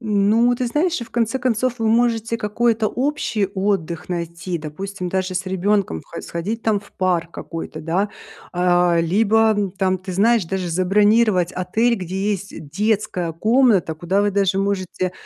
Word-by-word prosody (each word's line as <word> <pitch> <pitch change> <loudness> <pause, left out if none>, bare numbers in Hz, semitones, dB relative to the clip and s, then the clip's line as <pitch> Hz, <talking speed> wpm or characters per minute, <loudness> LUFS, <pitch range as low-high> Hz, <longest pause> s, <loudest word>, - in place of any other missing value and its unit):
Ну, 220 +2 +3
ты 245 0 -2
знаешь, 320 +5 0
и 235 - -4
в 225 - -19
конце 235 +2 0
концов 250 0 0
вы 225 - +1
можете 230 0 +1
какой-то 225 +1 +1
общий 250 -6 -1
отдых 190 -5 -1
найти, 170 0 -4
допустим 180 +5 -6
даже 185 0 -2
с 185 +1 -2
ребенком 190 - 0
хо 170 - -8
сходить 205 +7 -4
там 210 -3 +1
в 200 - -19
парк 175 -3 0
какой-то 165 -2 -7
да, 185 +6 -1 0.4
а, 175 -1 +3
либо 205 +3 +2
там, 190 -1 +2
ты 185 0 -7
знаешь, 220 +2 +3
даже 185 +1 -3
забронировать 195 +1 +3
отель, 225 +6 +1
где 190 +1 -2
есть 200 +1 -5 0.2
детская 200 -2 -1
комната, 215 -3 +3
куда 175 +5 0
вы 205 - +2
даже 195 -1 +1
можете, 185 -2 -1
200 Hz, 155 wpm, -21 LUFS, 180-225 Hz, 0.4 s, Ну